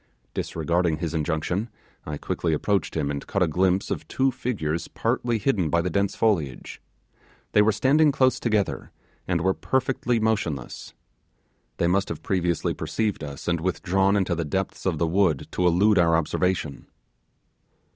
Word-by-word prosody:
Disregarding 85 0 0
his 85 -2 -3
injunction, 80 +7 -1 0.4
I 75 -1 -3
quickly 80 +2 -2
approached 100 +3 0
him 70 -2 0
and 70 -1 -5
caught 100 - +1
a - - +2
glimpse 95 +4 +1
of - - -3
two 135 0 +1
figures 100 -11 -3
partly 120 -1 -1
hidden 100 - +1
by 85 +1 +2
the 90 - -2
dense 100 +2 0
foliage; 85 -12 -1 0.7
they 105 - +5
were 105 +1 +4
standing 145 +8 +4
close 130 -1 +2
together, 110 -4 -1 0.4
and 85 -2 0
were 95 +2 +2
perfectly 125 -1 0
motionless. 85 - -2 0.8
They - - +1
must 95 +3 +1
have 80 -1 -6
previously 90 -3 0
perceived 105 -7 -2
us, 70 -1 -7
and 85 -2 0
withdrawn 95 +2 +1
into 95 -2 +1
the 85 0 -1
depths 95 +6 -3
of 85 -4 0
the 85 - +1
wood 85 -4 +1
to 90 - +1
elude 95 +4 +4
our 85 -1 +4
observation. 85 -2 -1
90 Hz, 155 wpm, -25 LUFS, 80-105 Hz, 0.8 s, they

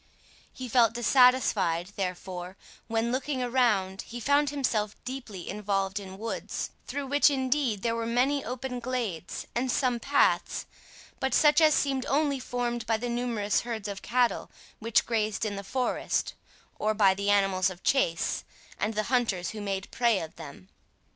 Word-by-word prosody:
He 255 - -7
felt 230 -2 +4
dissatisfied, 230 -8 +3
therefore, 185 -1 -5 0.3
when, 230 +1 0
looking 260 0 -1
around, 215 -7 +1
he 240 - -8
found 285 +4 +3
himself 230 -7 -1
deeply 240 -8 -6
involved 195 -1 -1
in 190 -1 -9
woods, 225 +2 -4 0.2
through 285 0 -3
which 285 +2 +4
indeed 260 -6 0
there 230 - +1
were 230 0 -2
many 265 +4 +1
open 250 0 -4
glades, 230 -9 -4
and 250 +2 0
some 250 -3 +1
paths, 280 +4 +2 0.5
but 265 -1 0
such 300 +1 +5
as 310 -1 +6
seemed 270 -2 0
only 285 -1 +1
formed 240 -2 -3
by 225 -1 +2
the 245 +2 -4
numerous 235 -4 0
herds 225 -3 -4
of 200 -1 -5
cattle 245 -1 +1 0.3
which 230 0 +2
grazed 215 -2 0
in 205 -1 -2
the 200 - -6
forest, 250 +5 -1 0.5
or 215 +1 +1
by 200 -3 +5
the 200 +1 -2
animals 195 -2 +3
of 185 -1 -11
chase, 170 -12 +1 0.4
and 215 +1 -1
the 215 - +1
hunters 210 -8 +1
who 215 - -7
made 195 -1 -3
prey 235 -4 +2
of 160 -1 -7
them. 160 +4 -11
230 Hz, 160 wpm, -28 LUFS, 200-255 Hz, 0.5 s, as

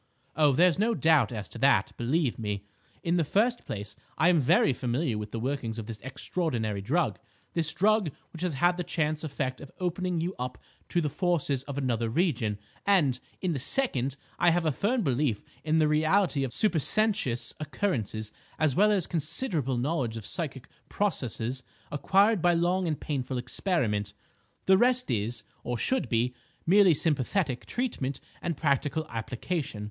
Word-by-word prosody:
Oh, 150 -2 +4
there's 175 +5 +4
no 225 +2 +2
doubt 160 -7 +4
as 105 -4 -5
to - - -9
that, - - +4
believe 130 +2 0
me. 105 -2 -3 0.4
In 170 +1 +1
the 170 - +3
first 230 - +1
place, 105 0 -5 0.2
I 175 - +4
am 175 -3 +4
very 135 0 +4
familiar 125 +1 -1
with 105 0 -4
the 115 - -4
workings 120 -2 -2
of 110 - -5
this 110 -2 -7
extraordinary 120 - -1
drug, 155 - 0 0.3
this 160 -2 0
drug 210 -2 +2 0.2
which 165 - -9
has 180 -5 -1
had 175 +6 +3
the 180 - -1
chance 155 -2 -1
effect 135 -4 -3
of 140 - -9
opening 180 -1 -1
you 175 +3 -2
up 125 0 -4 0.3
to 175 - +1
the 155 - 0
forces 150 -5 0
of 140 -1 -6
another 120 -4 0
region; 120 - 0 0.3
and, 150 -11 +3 0.2
in 180 -3 0
the 140 - -2
second, 140 - 0 0.2
I 175 - +5
have 170 0 +1
a 155 - +3
firm 220 - 0
belief 130 - 0 0.2
in 155 0 +2
the 155 -1 +4
reality 155 0 +2
of 130 - -2
supersensuous 200 - +1
occurrences 120 - -2 0.3
as 155 -5 +2
well 210 +2 +5
as 195 -5 +2
considerable 155 - -1
knowledge 125 -4 -1
of 110 - -7
psychic 140 -6 -3 0.2
processes 130 - -1 0.3
acquired 195 +7 +3
by 175 0 +4
long 175 +2 +1
and 155 -2 -1
painful 130 -3 -3
experiment. 125 - -1 0.5
The 190 0 +5
rest 250 - +3
is, 110 0 -1 0.2
or 120 0 -2
should 260 - +1
be, 120 +1 +1 0.3
merely 190 -1 +6
sympathetic 145 -1 0
treatment 180 - -2 0.2
and 170 -4 -2
practical 145 +1 0
application. 125 +3 -4
150 Hz, 165 wpm, -28 LUFS, 125-180 Hz, 0.5 s, merely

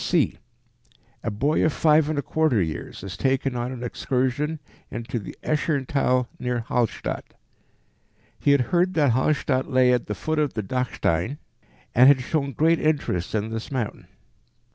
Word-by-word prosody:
c). - - +2 0.9
A - - -2
boy 135 +9 +1
of 160 - +3
five 155 0 +3
and 155 - -1
a 145 - 0
quarter 155 -8 +1
years 80 0 -4
is 100 0 -6
taken 135 +2 0
on 120 +1 -2
an 125 -2 -6
excursion 130 +5 -1 0.3
into 120 0 -4
the 100 - -9
Escherntal 140 -4 +1
near 125 -1 -1
Hallstatt. 115 0 -2 1.0
He - - +1
had 140 -2 +5
heard 180 +2 +3
that 145 -5 +4
Hallstatt 130 +1 +1
lay 130 -2 +4
at 125 - 0
the 105 - -3
foot 155 +10 -2
of 150 -2 0
the 110 - -2
Dachstein, 120 - -1 0.6
and 125 +2 +7
had 140 -2 +6
shown 140 +1 -1
great 160 +5 +3
interest 140 - 0
in 110 +1 -1
this 110 0 -5
mountain. 125 -6 -3
130 Hz, 160 wpm, -24 LUFS, 120-150 Hz, 1.0 s, and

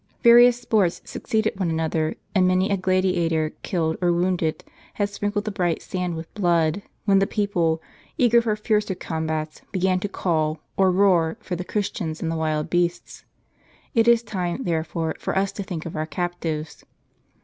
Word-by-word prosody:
Various 240 0 +7
sports 210 -7 +1
succeeded 220 -2 -2
one 185 -3 0
another; 160 -1 -1 0.2
and 185 -2 +4
many 185 +2 +2
a - - +3
gladi 185 0 +1
ator 160 -2 0
killed, 160 -3 -1
or 175 -1 +3
wounded, 175 -2 0 0.3
had 205 -1 0
sprinkled 205 +1 -2
the 215 - -2
bright 175 -4 -1
sand 180 -2 -3
with 160 0 -8
blood, 170 -3 +1 0.2
when 195 -2 +5
the 195 - +2
people, 170 -6 0 0.3
eager 235 -1 +5
for 220 -2 0
fiercer 210 -2 0
combats, 160 -2 -3
began 185 -1 +1
to 205 - -3
call, 155 -5 0 0.2
or 190 -1 +4
roar 180 -4 +3
for 180 - -4
the 180 - -4
Christians 180 -5 -3
and 165 - -2
the - - -2
wild 155 -1 -1
beasts. 175 0 -2 0.7
It 230 -1 +3
is 235 -1 +5
time, 190 +1 -3
therefore, 160 -1 -1
for - - -2
us 195 0 +1
to - - -6
think 180 -4 -5
of 170 - -6
our 155 0 -2
captives. 165 -3 -4
180 Hz, 170 wpm, -23 LUFS, 160-200 Hz, 0.7 s, Various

